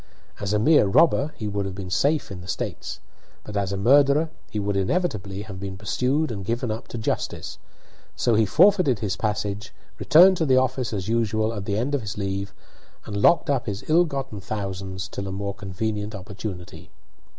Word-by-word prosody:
As 100 -1 -2
a 105 - +3
mere 120 +1 +5
robber 150 +5 +4
he 110 - -4
would 100 -1 -2
have 95 - -6
been 95 -2 -7
safe 145 +6 +1
in 95 -2 -7
the 90 - -11
States, - - -4 0.4
but 105 - -8
as 100 -2 0
a 100 - -2
murderer 140 +8 +4 0.2
he 105 - -5
would 100 -1 -1
inevitably 100 - -1
have 100 -3 -8
been 95 -1 -6
pursued 125 - 0
and 100 -3 -5
given 115 +3 -2
up 110 +2 -5
to - - -7
justice. 110 - -3 0.6
So 120 - +1
he 110 -1 +3
forfeited 180 - +4
his 100 -3 -2
passage, 105 -1 -3 0.3
returned 185 +4 +7
to 160 - +1
the 130 -1 +5
office 130 -1 +1
as 100 -3 -3
usual 110 -1 +1
at 100 -3 -5
the 100 0 -1
end 130 +6 -1
of 140 - +1
his 105 -1 -6
leave, 100 -1 -3 0.5
and 105 - -6
locked 170 +9 +5
up 135 -4 -1
his 100 -1 -4
ill 170 +3 +5
gotten 135 -8 -5
thousands 95 -2 -4
till 100 +1 -6
a - - -4
more 100 +1 -3
convenient 105 +2 -4
opportunity. 95 -4 -8
105 Hz, 195 wpm, -24 LUFS, 100-130 Hz, 0.6 s, returned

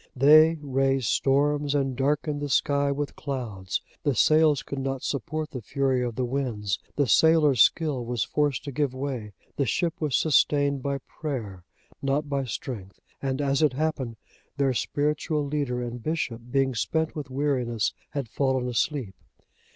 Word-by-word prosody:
They 155 +5 +7
raised 135 -2 +1
storms, 145 +1 +2
and 135 -2 0
darkened 145 +2 0
the 145 - -3
sky 140 +1 +2
with 145 +1 -3
clouds. 115 -10 -4 0.2
The 145 -3 0
sails 155 0 +4
could 140 +3 -5
not 135 -1 -3
support 150 +4 -3
the 130 - -5
fury 135 +2 0
of 120 -2 -3
the 125 - 0
winds, 120 -7 -2 0.2
the 145 - +2
sailors' 150 -2 +5
skill 150 -3 +3
was 120 -1 -1
forced 145 -3 0
to 145 - -5
give 140 -1 -1
way, 130 -6 -4 0.2
the 140 - +1
ship 170 - 0
was 150 -4 +1
sustained 145 -2 +3
by 140 +1 -1
prayer, 110 - -5 0.4
not 140 +2 0
by 140 -2 -1
strength, 105 -4 -6 0.2
and 135 0 -2
as 140 0 +1
it 150 -4 +3
happened, 135 -5 -2 0.4
their 135 -2 +2
spiritual 150 +3 -1
leader 140 -4 -2
and 120 0 -5
bishop, 130 -6 -2
being 135 0 +1
spent 160 +7 -1
with 150 -4 -5
weariness, 130 -5 0 0.2
had 140 -4 -4
fallen 130 +1 0
asleep. 125 -3 -1
140 Hz, 160 wpm, -26 LUFS, 125-145 Hz, 0.4 s, They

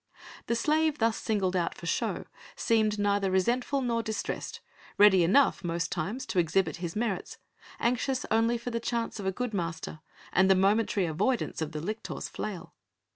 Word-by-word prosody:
The 235 - +1
slave 305 +5 +2
thus 225 -2 +2
singled 195 -4 -1
out 175 -2 0
for - - -10
show - - -1 0.3
seemed 220 -2 +2
neither 200 -1 +1
resentful 245 +9 +1
nor 235 -2 0
distressed, 220 -1 -4 0.4
ready 195 -3 +7
enough 210 +10 +3
most 170 -1 -2
times 200 +10 -3
to 185 - 0
exhibit 165 -1 +1
his 170 -1 -5
merits, 215 -4 -2 0.4
anxious 250 +2 0
only 225 +2 +3
for 235 +1 -5
the 230 - -1
chance 230 -1 -2
of 195 - -3
a - - +2
good 245 +3 -3
master 165 -4 -4 0.3
and 190 +1 +4
the 190 - +7
momentary 200 0 +2
avoidance 200 +7 -1
of 160 -1 -2
the 155 -1 -5
lictor's 215 +6 -4
flail. 200 -5 -6
210 Hz, 170 wpm, -29 LUFS, 180-235 Hz, 0.4 s, ready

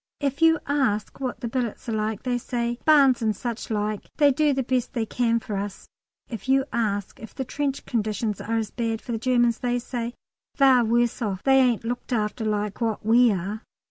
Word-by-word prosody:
If 280 +1 -2
you 325 0 +6
ask 260 -8 0
what 260 -2 -4
the 235 - -2
billets 240 -1 -3
are - - -2
like, 215 -1 -2
they 250 -2 0
say, 240 0 -2
"Barns 275 -6 +5
and 215 -2 +1
suchlike; 215 -2 -3
they 290 -2 +5
do 300 +2 +2
the 265 -1 0
best 255 0 -1
they 230 -4 -1
can 230 0 +1
for 215 -2 -5
us." 200 0 -5 0.4
If 225 +1 -7
you 270 0 +4
ask 205 -4 -2
if 225 - -11
the 265 - -3
trench 280 +1 -3
conditions 215 -2 -2
are 230 +1 -1
as 220 -2 -2
bad 225 -2 -2
for 240 - -8
the 225 - -2
Germans, 240 -1 +2
they 245 0 0
say, 240 -1 -4 0.4
"They're 265 -3 +6
worse 235 +2 +1
off; 195 -4 -2
they 270 0 +5
ain't 245 -4 +2
looked 245 +2 -4
after 220 0 -1
like 210 0 -2
what 225 -3 -1
we 235 +1 +5
are." 200 +3 -3
235 Hz, 205 wpm, -25 LUFS, 215-255 Hz, 0.4 s, you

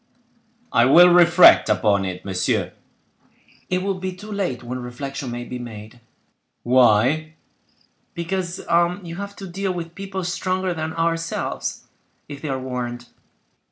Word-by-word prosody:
"I 120 0 +5
will 175 +7 +8
reflect 175 0 +7
upon 100 -3 +2
it, 90 -1 -6
monsieur." 95 -1 -1 1.0
"It 185 0 0
will 195 -1 -2
be 185 0 -4
too 210 +4 -11
late 185 - -3
when 125 +1 -5
reflection 130 +2 -6
may 120 0 -5
be 125 +1 -7
made." 110 0 -10 0.6
"Why?" 130 +6 +3 0.8
"Because 175 +1 -3 0.4
you 170 0 -8
have 200 +1 -6
to 195 - -9
deal 190 +2 -3
with 170 -1 -6
people 195 0 -5
stronger 185 +1 -2
than 160 -1 -4
ourselves, 165 0 -2 0.4
if 140 -1 -9
they 155 - -5
are 135 - -1
warned." 120 -2 -5
160 Hz, 135 wpm, -22 LUFS, 120-180 Hz, 1.0 s, will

